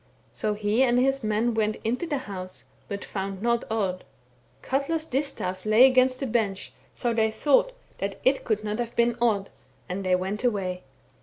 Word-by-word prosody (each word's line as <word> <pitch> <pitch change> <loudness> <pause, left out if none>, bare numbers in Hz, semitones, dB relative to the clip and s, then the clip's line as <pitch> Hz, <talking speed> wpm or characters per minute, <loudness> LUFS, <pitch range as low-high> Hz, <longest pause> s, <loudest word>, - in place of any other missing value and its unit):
So 210 -1 -1
he 210 +3 +1
and 245 -2 +4
his 270 +1 +2
men 215 +2 +1
went 215 -1 +1
into 250 +9 -1
the 295 -3 -1
house, 185 -7 -7 0.2
but 200 -1 -5
found 195 0 -4
not 235 0 +2
Odd. 195 -5 -1 0.6
Katla's 300 +4 -1
distaif 255 -11 -2
lay 215 +4 +7
against 255 -1 +4
the 275 - -2
bench, 215 -5 -1 0.2
so 240 -1 0
they 220 -1 +2
thought 285 - +2 0.3
that 195 0 -3
it 265 +1 +3
could 215 -2 -1
not 210 +1 -3
have 235 -1 -3
been 235 0 +3
Odd, 205 -5 +1 0.4
and 190 +2 -4
they 185 -1 +3
went 190 +5 -3
away. 190 -6 -1
220 Hz, 175 wpm, -26 LUFS, 200-255 Hz, 0.6 s, lay